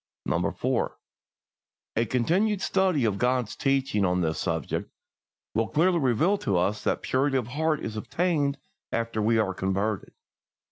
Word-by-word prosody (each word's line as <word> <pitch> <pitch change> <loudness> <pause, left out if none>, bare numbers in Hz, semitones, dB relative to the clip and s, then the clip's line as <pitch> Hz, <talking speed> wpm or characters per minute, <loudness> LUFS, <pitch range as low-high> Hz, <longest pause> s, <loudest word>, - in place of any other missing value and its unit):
4. - - -1 1.0
A 115 - +2
continued 185 - +1
study 185 -9 +2
of 100 -3 0
God's 125 -3 +1
teaching 135 -6 +1
on 90 -1 +2
this 80 -2 -1
subject 80 -5 -2 0.6
will 110 0 +1
clearly 170 +3 +2
reveal 155 - +2
to 95 - 0
us 100 +4 0
that - - 0
purity 135 +1 +1
of 120 -2 -2
heart 155 +3 0
is 110 - -4
obtained 145 +3 0 0.3
after 115 -1 -1
we 115 +2 +3
are 100 -4 +1
converted. 100 +2 -2
120 Hz, 140 wpm, -27 LUFS, 105-150 Hz, 1.0 s, we